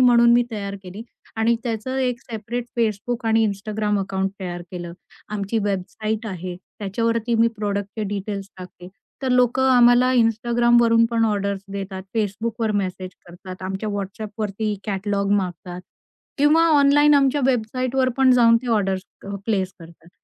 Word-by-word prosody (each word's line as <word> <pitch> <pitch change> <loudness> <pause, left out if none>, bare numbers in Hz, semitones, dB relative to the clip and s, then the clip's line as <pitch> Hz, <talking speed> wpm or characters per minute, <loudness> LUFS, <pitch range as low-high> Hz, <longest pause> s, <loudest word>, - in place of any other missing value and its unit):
म्हणून 235 -1 +6
मी 240 0 +5
तयार 200 -3 -4
केली 190 +4 -9 0.3
आणि 225 +1 +2
त्याचं 240 +2 -3
एक 250 -2 -1
सेपरेट 230 +2 -5
Facebook 230 +2 -1
आणि 225 0 +3
Instagram 210 +1 -2
अकाउंट 190 0 -2
तयार 175 -2 -5
केलं. 175 -2 -6 0.4
आमची 205 +2 -1
वेबसाईट 215 +3 -3
आहे. 185 -3 -5 0.2
त्याच्यावरती 230 +3 -1
मी 230 +1 +4
प्रॉडक्टचे 205 +1 -3
डिटेल्स 200 0 -5
टाकते. 180 -1 -11 0.3
तर 265 - 0
लोकं 250 +1 +3
आम्हाला 245 +1 +5
Instagramवरून 235 0 +3
पण 230 -1 +2
ऑर्डर्स 200 -2 -1
देतात. 195 -1 -5
Facebookवर 220 +2 -1
मेसेज 185 0 -5 0.2
करतात. 185 +1 -10
आमच्या 190 +3 -4
WhatsAppवरती 205 +1 -4
कॅटलॉग 200 -1 -1
मागतात. 180 -1 -4 0.6
किंवा 300 +3 +5 0.2
ऑनलाईन 290 +1 +5
आमच्या 280 0 +3
वेबसाईटवर 255 +2 0
पण 265 -1 +5
जाऊन 230 -2 +6
ते - - -7
ऑर्डर्स 195 -3 +1 0.2
अ, - - -8 0.2
प्लेस 190 -4 0
करतात. 165 0 -15
215 Hz, 140 wpm, -22 LUFS, 195-235 Hz, 0.6 s, म्हणून